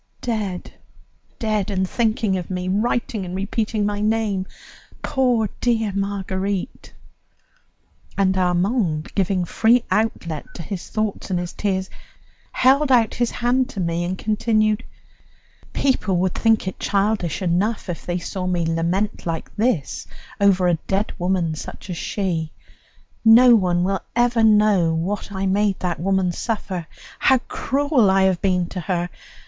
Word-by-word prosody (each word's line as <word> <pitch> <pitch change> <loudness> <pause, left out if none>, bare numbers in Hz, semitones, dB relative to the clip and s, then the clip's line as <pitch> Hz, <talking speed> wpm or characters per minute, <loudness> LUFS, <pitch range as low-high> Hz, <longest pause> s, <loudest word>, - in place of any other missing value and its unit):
Dead! 210 -6 -3 0.6
Dead 215 -3 -1
and 190 -2 0
thinking 220 -2 0
of 180 -2 -4
me, 180 -1 -3
writing 215 +1 0
and 180 0 -5
repeating 210 +2 -1
my 205 0 -1
name, 210 -3 0 0.6
poor 245 -5 +1
dear 225 -4 +1
Marguerite!" 195 -1 -3 1.3
And 190 -1 +2
Armand, 180 -2 0
giving 190 -2 0
free 230 +6 +3
outlet 170 -8 -1
to 170 - -6
his 180 +2 -6
thoughts 215 -2 -2
and 185 - 0
his 175 0 -4
tears, 190 -2 -1 0.6
held 270 +2 +3
out 235 -4 +4
his 240 -1 0
hand 250 +2 0
to 215 - -7
me, 170 -1 -1
and 180 +2 -3
continued: 215 +1 +1 0.9
"People 215 -9 +1
would 185 +1 +1
think 225 -3 +2
it 190 - -5
childish 200 -3 0
enough 190 +6 0
if 175 -2 -5
they 175 0 -2
saw 180 +1 -4
me 175 -2 0
lament 170 +5 -1
like 165 -1 -4
this 210 - -1 0.3
over 190 -3 +4
a 170 -2 +2
dead 195 +3 0
woman 175 -2 0
such 155 +4 -8
as 170 - -4
she; 165 -6 -2 0.7
no 235 +2 +8
one 180 -4 +2
will 195 +1 0
ever 240 -1 +3
know 210 -6 +4
what 195 +6 -3
I 195 -1 -2
made 200 0 +1
that 175 -2 -2
woman 190 0 +1
suffer, 185 -4 -3 0.3
how 265 - +5
cruel 280 -6 +1
I 190 0 +4
have 190 -2 +2
been 180 -3 +1
to 185 - -5
her! 175 -1 -1
195 Hz, 145 wpm, -22 LUFS, 180-220 Hz, 1.3 s, no